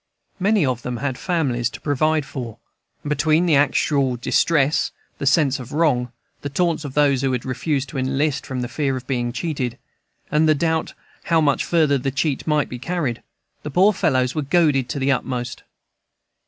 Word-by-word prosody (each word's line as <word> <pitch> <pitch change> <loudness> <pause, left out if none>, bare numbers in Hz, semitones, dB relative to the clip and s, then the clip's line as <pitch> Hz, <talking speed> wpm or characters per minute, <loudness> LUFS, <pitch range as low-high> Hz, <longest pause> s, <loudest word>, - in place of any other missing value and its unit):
Many 200 -2 +3
of 125 -3 -1
them 125 0 -4
had 135 0 -2
families 130 -9 -1
to - - -10
provide 155 +1 +1
for, 120 -5 -7 0.5
and 145 - -5
between 155 +3 +2
the 165 -4 +4
actual 140 -2 +2
distress, 145 +4 +2 0.3
the 140 - -2
sense 140 -1 +3
of 125 +1 -9
wrong, 135 -7 +1 0.3
the 145 - -4
taunts 165 +2 0
of 140 -3 -7
those 140 -3 +3
who 135 -1 +1
had 125 - -3
refused 135 +2 -1
to 135 - -4
enlist 135 +3 0
from 130 -1 -4
the 120 - -2
fear 135 +1 -1
of 125 - -8
being 120 -2 -1
cheated, 125 -2 -3 0.5
and 155 +1 +3
the 155 - +5
doubt 160 +1 -1 0.3
how 165 -1 +3
much 145 -3 +2
farther 155 -5 +2
the 135 - -1
cheat 140 +1 -2
might 150 -2 +2
be 125 - -7
carried, 140 -5 -2 0.4
the 150 - -6
poor 190 +8 +4
fellows 130 -7 +1
were 155 - -1
goaded 145 -4 +2
to - - -3
the 140 0 +1
utmost. 125 -2 -3
140 Hz, 185 wpm, -21 LUFS, 130-155 Hz, 0.5 s, the